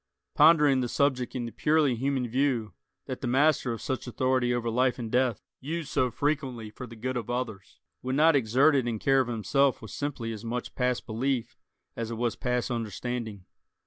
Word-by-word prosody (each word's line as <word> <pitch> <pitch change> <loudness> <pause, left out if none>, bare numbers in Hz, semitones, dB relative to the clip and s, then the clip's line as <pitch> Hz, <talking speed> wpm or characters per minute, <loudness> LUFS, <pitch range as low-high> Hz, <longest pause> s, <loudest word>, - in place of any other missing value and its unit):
Pondering 150 -4 +5
the 120 - -2
subject 130 -3 0
in 120 -2 -2
the 115 - -6
purely 150 -1 +2
human 130 +1 -1
view, 120 -3 0 0.3
that 130 -2 -6
the 130 - -2
master 135 0 +3
of 115 - -5
such 130 -2 -3
authority 130 0 +1
over 120 -1 -1
life 125 +2 +1
and 115 -3 -5
death, 125 -3 +1 0.2
used 155 +2 -4
so 130 -3 +1
frequently 130 -4 -2
for 125 +3 -8
the 115 - -11
good 130 +3 -3
of 120 -2 -4
others, 120 -6 -4 0.2
would 130 +1 -2
not 155 +2 +5
exert 135 +4 +4
it 130 -3 +1
in 115 -2 -1
care 135 +4 +3
of 130 - +1
himself 125 +4 +1
was 110 -4 -10
simply 130 -6 -3
as 110 0 -8
much 120 +1 -4
past 125 -1 -1
belief 125 +2 -2 0.4
as 115 -1 -4
it 115 - -4
was 120 -1 -1
past 125 0 -1
understanding. 115 -2 -4
125 Hz, 195 wpm, -28 LUFS, 115-135 Hz, 0.4 s, Pondering